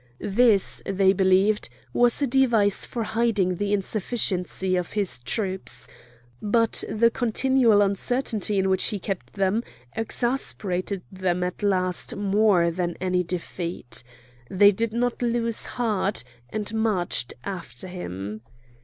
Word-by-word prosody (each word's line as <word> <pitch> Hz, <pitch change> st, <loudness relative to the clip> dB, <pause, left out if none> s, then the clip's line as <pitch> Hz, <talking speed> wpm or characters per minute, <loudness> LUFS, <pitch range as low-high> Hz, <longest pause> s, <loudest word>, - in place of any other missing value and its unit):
This, 220 Hz, -3 st, +4 dB
they 195 Hz, 0 st, +3 dB
believed, 190 Hz, -, +2 dB, 0.2 s
was 245 Hz, +3 st, +4 dB
a -, -, +4 dB
device 235 Hz, -6 st, +2 dB
for 235 Hz, -, -3 dB
hiding 215 Hz, -5 st, 0 dB
the 205 Hz, +1 st, -2 dB
insufficiency 190 Hz, -2 st, 0 dB
of 180 Hz, -1 st, -3 dB
his 200 Hz, -11 st, 0 dB
troops. 185 Hz, -, -4 dB, 0.5 s
But 230 Hz, +2 st, +2 dB
the 230 Hz, +2 st, +3 dB
continual 240 Hz, -2 st, +3 dB
uncertainty 210 Hz, +1 st, 0 dB
in 190 Hz, 0 st, +2 dB
which 190 Hz, -1 st, +2 dB
he 210 Hz, -, +1 dB
kept 195 Hz, -1 st, -5 dB
them 195 Hz, +3 st, +1 dB, 0.3 s
exasperated 210 Hz, -6 st, -2 dB
them 185 Hz, -2 st, -1 dB
at 180 Hz, +3 st, -4 dB
last 185 Hz, -3 st, 0 dB
more 200 Hz, -4 st, +3 dB
than 175 Hz, 0 st, -3 dB
any 180 Hz, 0 st, +1 dB
defeat. 170 Hz, -6 st, -5 dB, 0.5 s
They 205 Hz, +2 st, +6 dB
did 225 Hz, +3 st, -2 dB
not 245 Hz, +2 st, -1 dB
lose 235 Hz, -1 st, 0 dB
heart, 215 Hz, -, -1 dB, 0.3 s
and 210 Hz, -, -4 dB
marched 185 Hz, -, 0 dB
after 185 Hz, -1 st, -6 dB
him. 105 Hz, -, -6 dB
200 Hz, 125 wpm, -25 LUFS, 185-225 Hz, 0.5 s, They